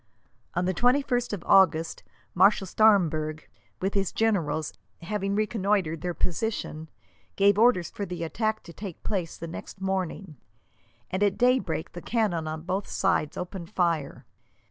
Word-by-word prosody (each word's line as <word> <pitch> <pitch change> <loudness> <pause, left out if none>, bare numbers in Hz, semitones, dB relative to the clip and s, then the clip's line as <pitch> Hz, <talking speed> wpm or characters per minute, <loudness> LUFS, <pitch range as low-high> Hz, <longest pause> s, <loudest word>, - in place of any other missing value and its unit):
On 180 +1 +1
the 185 - +1
21st 245 +2 +2
of 205 -5 -4
August 165 -4 +4 0.3
Marshal 195 +2 +4
Staremberg, 160 -7 +3 0.4
with 190 +2 -1
his 195 -2 0
generals, 165 -9 0 0.3
having 200 +1 -2
reconnoitred 200 -6 0
their 175 0 -3
position, 165 -4 -3 0.5
gave 200 +1 +4
orders 225 -7 +4
for 205 - -5
the 175 -1 -4
attack 220 +6 -1
to 170 - -11
take 190 -3 -8
place 180 -6 -2
the 170 - -6
next 170 +3 -8
morning, 190 -3 -3 0.7
and 185 - -2
at 200 -2 +2
daybreak 245 -10 +1
the 175 - -8
cannon 200 -9 0
on 155 0 -5
both 185 +3 -2
sides 190 -6 0
opened 180 -1 -6
fire. 165 -6 -1
190 Hz, 145 wpm, -27 LUFS, 165-210 Hz, 0.7 s, August